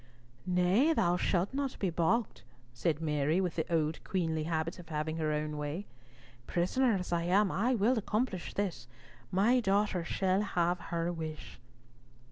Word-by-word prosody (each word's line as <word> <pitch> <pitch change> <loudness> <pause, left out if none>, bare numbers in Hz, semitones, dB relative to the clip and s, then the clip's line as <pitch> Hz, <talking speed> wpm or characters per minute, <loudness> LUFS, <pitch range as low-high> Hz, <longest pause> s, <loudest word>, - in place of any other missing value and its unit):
"Nay, 185 - +3
thou 175 - +2
shalt 180 +3 0
not 275 -1 -2
be 190 -3 -1
balked," 175 +8 0 0.3
said 155 +4 -1
Mary, 150 +2 +1
with 180 -4 -1
the 160 +1 -2
old 160 -1 0
queenly 160 -4 -1
habit 165 +1 -2
of 170 -2 -12
having 155 +1 -2
her 155 -1 0
own 150 0 -2
way. 150 +7 -4 0.6
"Prisoner 225 +7 +2
as 180 -2 -3
I 170 - +1
am, 195 +3 +3
I 245 +6 +1
will 230 +3 +2
accomplish 210 -3 -2
this. 175 -12 -2 0.4
My 220 +7 +4
daughter 200 -4 +1
shall 190 +2 +1
have 175 -3 0
her 170 0 -1
wish." 160 -5 -7
175 Hz, 155 wpm, -32 LUFS, 160-200 Hz, 0.6 s, My